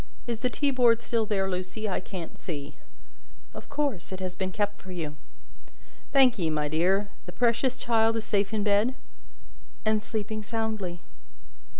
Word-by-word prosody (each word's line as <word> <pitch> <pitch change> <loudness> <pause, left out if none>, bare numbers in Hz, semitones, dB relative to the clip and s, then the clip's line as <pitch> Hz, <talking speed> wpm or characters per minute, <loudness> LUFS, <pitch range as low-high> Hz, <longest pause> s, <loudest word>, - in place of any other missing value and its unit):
Is 235 -2 -2
the 250 - +1
teaboard 250 -5 +3
still 230 -2 0
there, 195 -2 +1
Lucie? 185 +4 -3
I 195 - 0
can't 185 -3 -7
see." 145 -4 -6 0.8
"Of - - -10
course, 285 - -1
it 190 - -4
has 185 -1 -3
been 190 0 -2
kept 205 +1 -1
for 190 - -9
you." 160 -4 -4 1.0
"Thank 260 -5 +6
ye, 165 -3 +1
my 150 -1 0
dear. 185 +7 +2 0.2
The - - -5
precious 240 +5 +2
child 225 -1 +3
is 220 - -3
safe 200 -1 +1
in 215 -2 0
bed?" 210 +5 +3 0.9
"And 215 0 +3
sleeping 215 0 -3
soundly." 210 -5 -2
210 Hz, 160 wpm, -28 LUFS, 185-230 Hz, 1.0 s, Thank